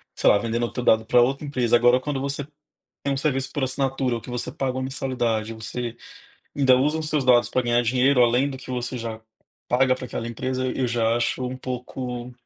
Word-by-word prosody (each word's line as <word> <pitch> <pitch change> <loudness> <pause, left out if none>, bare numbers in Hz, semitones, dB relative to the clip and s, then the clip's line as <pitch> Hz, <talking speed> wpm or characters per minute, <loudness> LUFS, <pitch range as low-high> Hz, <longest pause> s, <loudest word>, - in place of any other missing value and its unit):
sei - - +3
lá, - - +6
vendendo 115 +2 -2
teu 125 - -3
dado 110 -2 +4
pra 120 +2 +5
outra 135 +4 0
empresa, 125 -5 +1
agora, 120 +2 +4
quando 140 0 -3
você 140 +1 -2 0.6
tem 140 - 0
um - - -1
serviço 135 -1 -1
por 140 -3 -1
assinatura 130 -1 -1
ou - - -5
que 125 - -10
você 120 -1 -3
paga 135 -1 -2
uma 130 - -2
mensalidade, 120 -4 -2
você 115 +2 -5 0.6
ainda 135 -2 +5
usam 150 +5 +1
seus 155 -3 0
dados 120 -3 +5
pra 130 - +1
ganhar 120 0 +2
dinheiro 125 +2 +3
além 120 +4 +3
do 135 - -6
que 130 - -10
você 125 0 -3
já 115 -1 -5 0.5
paga 130 +1 +3
para 130 - -8
aquela 115 - -5
empresa. 130 +2 -3
E 130 - -3
eu 130 - +2
já 115 -1 +1
acho 120 +2 -1
um 130 +1 -5
pouco, 125 -1 -5
125 Hz, 215 wpm, -24 LUFS, 120-135 Hz, 0.6 s, lá